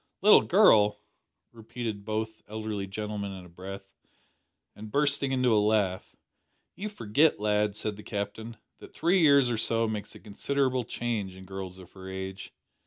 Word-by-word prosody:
"Little 210 - +8
girl," 110 - +5 0.5
repeated 115 -2 -6
both 110 0 -3
elderly 110 -2 -4
gentlemen 105 0 -4
in 95 -2 -9
a - - -14
breath, 95 +3 -9 0.9
and 105 +1 -9
bursting 140 +1 +1
into 130 -3 +2
a 105 - +4
laugh. 105 -4 0 0.6
"You 210 +2 -5
forget, 145 - +2
lad," 105 -1 +1
said 105 -1 -3
the - - -9
Captain, 110 +2 -5 0.2
"that - - -14
three 180 +2 +3
years 140 -5 +5
or 115 - -1
so 115 0 +1
makes 105 -2 -5
a - - -11
considerable 130 +4 -1
change 110 -6 -3
in 95 0 -12
girls 95 -1 -7
of 90 -2 -14
her 95 -1 -10
age. 95 0 -6
105 Hz, 160 wpm, -28 LUFS, 100-120 Hz, 0.9 s, Little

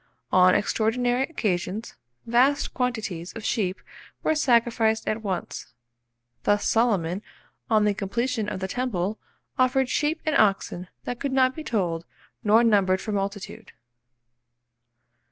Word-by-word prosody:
On 185 0 +6
extraordinary 245 +4 +1
occasions, 215 - -2 0.3
vast 255 +5 +2
quantities 220 -9 -3
of 225 -1 -8
sheep 195 -5 -1 0.4
were - - +2
sacrificed 235 -5 +2
at 215 +1 -1
once; 185 - -5 0.7
thus 205 0 +1
Solomon, 200 -6 +1 0.5
on 215 -1 +4
the 210 - +3
completion 220 +3 -2
of 190 -3 -5
the 190 - -1
temple, 210 -3 -2 0.4
offered 255 0 +3
"sheep 305 +4 0
and 310 -2 +1
oxen 195 -3 +1 0.2
that 245 -1 -5
could 280 - -2
not 260 -1 +3
be 315 - -7
told 175 - -2 0.4
nor 220 +2 +5
numbered 195 -4 +3
for 215 - -5
multitude." 200 +1 -4
220 Hz, 125 wpm, -25 LUFS, 195-245 Hz, 0.7 s, On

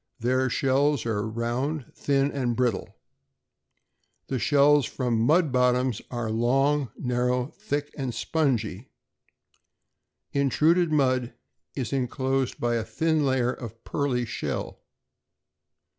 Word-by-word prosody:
Their 130 +2 +1
shells 135 +1 +1
are 110 -1 -1
round, 120 +6 -3
thin, 140 0 +1
and 125 -4 -1
brittle. 120 -5 -1 1.3
The 130 - -1
shells 145 0 +4
from 120 -4 -1
mud 155 +5 +3
bottoms 125 -2 +2
are 120 -3 -3
long, 135 +4 +2
narrow, 125 +1 -1
thick, 145 -8 -3
and 135 -3 -3
spongy. 120 - -1 1.4
Intruded 155 +6 +2
mud 130 -5 +1 0.4
is 125 -4 -3
enclosed 130 0 -1
by 120 -1 +1
a 115 - -1
thin 155 +8 0
layer 130 -2 +1
of 115 -1 -9
pearly 130 -4 -1
shell. - - -4
130 Hz, 110 wpm, -26 LUFS, 120-140 Hz, 1.4 s, shells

